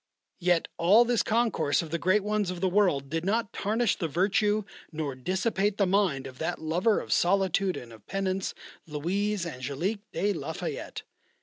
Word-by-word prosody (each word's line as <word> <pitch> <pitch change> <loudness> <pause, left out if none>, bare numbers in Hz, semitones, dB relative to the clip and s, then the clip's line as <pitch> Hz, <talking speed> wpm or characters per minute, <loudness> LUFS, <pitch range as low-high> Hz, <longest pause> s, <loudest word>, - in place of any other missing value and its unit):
Yet 175 -2 +2
all 200 +8 +6
this 240 -1 +2
concourse 225 -10 +1
of 160 - -9
the 170 - -1
great 185 +5 +2
ones 210 -2 0
of 180 -1 -4
the 190 - +1
world 180 -8 +2
did 165 +3 -2
not 220 +3 0
tarnish 220 +2 +1
the 165 - -1
virtue 205 +6 +1 0.3
nor 155 -3 -3
dissipate 190 - 0
the 200 - +3
mind 180 -8 +1
of 130 -1 -10
that - - -2
lover 175 +8 +1
of - - -2
solitude 190 0 +2
and 120 -2 -9
of 110 - -16
penance, 195 -1 -2 0.3
Louise 185 +6 -1
Angélique 155 - -3
de 200 +5 0
la 170 - -4
Fayette. - - -5
185 Hz, 175 wpm, -28 LUFS, 165-205 Hz, 0.3 s, all